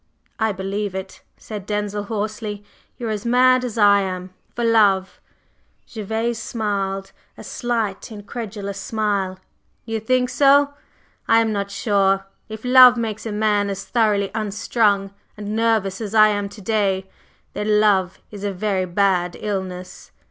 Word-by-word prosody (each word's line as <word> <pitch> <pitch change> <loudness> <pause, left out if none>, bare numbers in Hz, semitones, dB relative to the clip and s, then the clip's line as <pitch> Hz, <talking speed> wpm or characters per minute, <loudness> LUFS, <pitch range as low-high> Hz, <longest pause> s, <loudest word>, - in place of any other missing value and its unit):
"I 220 -1 +2
believe 195 +1 -3
it!" 190 0 -7 0.2
said 210 -3 -8
Denzil, 205 0 -2
hoarsely. 210 -1 -4 0.3
"You 245 - -6
are 220 - -1
as 210 -1 -3
mad 255 +1 +4
as 240 -3 -4
I 205 -2 +5
am 185 -1 -5 0.2
for 240 - -2
love!" 200 -5 +3 0.7
Gervase 225 +2 -3
smiled; 195 -4 -3 0.3
a - - -10
slight 230 -5 -3
incredulous 205 -2 -6
smile. 200 -4 -1 0.5
"You 225 -1 -2
think 250 +3 +1
so? 280 +2 +4 0.5
I 225 0 +5
am 225 -1 +1
not 200 -1 -2
sure! 195 -1 +1 0.2
If 220 +2 -8
love 250 -1 +8
makes 225 -1 -3
a - - -4
man 210 -1 +1
as 195 0 -5
thoroughly 210 -4 +1
unstrung 205 -2 0 0.2
and 210 0 -4
nervous 220 -3 +1
as 215 0 -4
I 215 0 +7
am 205 -1 -2
to 210 - -12
day, 195 -2 0 0.5
then 210 0 +1
love 190 -3 +2
is 205 -1 -9
a 205 - -1
very 190 0 -1
bad 180 -1 +1
illness." 185 -3 -5
210 Hz, 150 wpm, -21 LUFS, 195-225 Hz, 0.7 s, love